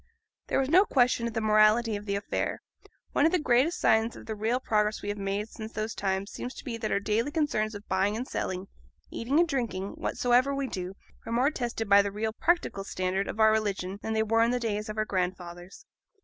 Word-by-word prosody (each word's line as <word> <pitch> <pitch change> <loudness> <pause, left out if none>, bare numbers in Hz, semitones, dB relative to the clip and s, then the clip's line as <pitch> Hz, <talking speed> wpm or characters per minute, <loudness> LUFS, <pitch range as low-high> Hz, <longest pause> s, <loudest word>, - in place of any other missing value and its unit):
There - - 0
was 270 - +1
no 355 +7 +6
question 245 - +2
of 230 - -5
the 225 - -1
morality 215 +1 +4
of 205 +1 -7
the 200 - 0
affair; 200 - -3 0.5
one 290 - +4
of - - 0
the 365 - +3
greatest 295 +3 +2
signs 220 +1 +3
of - - -11
the 220 - -4
real 220 +4 0
progress 215 -3 0
we 205 - -3
have 205 - -3
made 200 +2 -2
since 220 0 -9
those 215 +1 -3
times 195 0 -2
seems 250 - -6
to - - -9
be 250 -5 -4
that 220 -1 -3
our - - +2
daily 215 +6 0
concerns 290 -9 0
of 205 0 -10
buying 195 +3 +1
and 250 +3 -4
selling, 185 +1 -3 0.4
eating 265 +7 0
and 345 - +4
drinking, 230 - -2
whatsoever 250 +3 +1
we 275 0 -1
do, 185 -5 -5 0.3
are - - -4
more 250 +5 +2
tested 235 -5 -3
by 200 0 +7
the 200 0 -3
real 220 +2 -2
practical 335 - 0
standard 190 0 -2
of 220 - -6
our 220 0 +6
religion 200 -3 -1
than 220 - -3
they 220 0 +2
were 225 +1 +2
in 230 - +4
the 250 0 0
days 215 -2 -2
of 215 - -5
our 215 - +1
grandfathers. 180 - -4
220 Hz, 230 wpm, -28 LUFS, 200-245 Hz, 0.5 s, by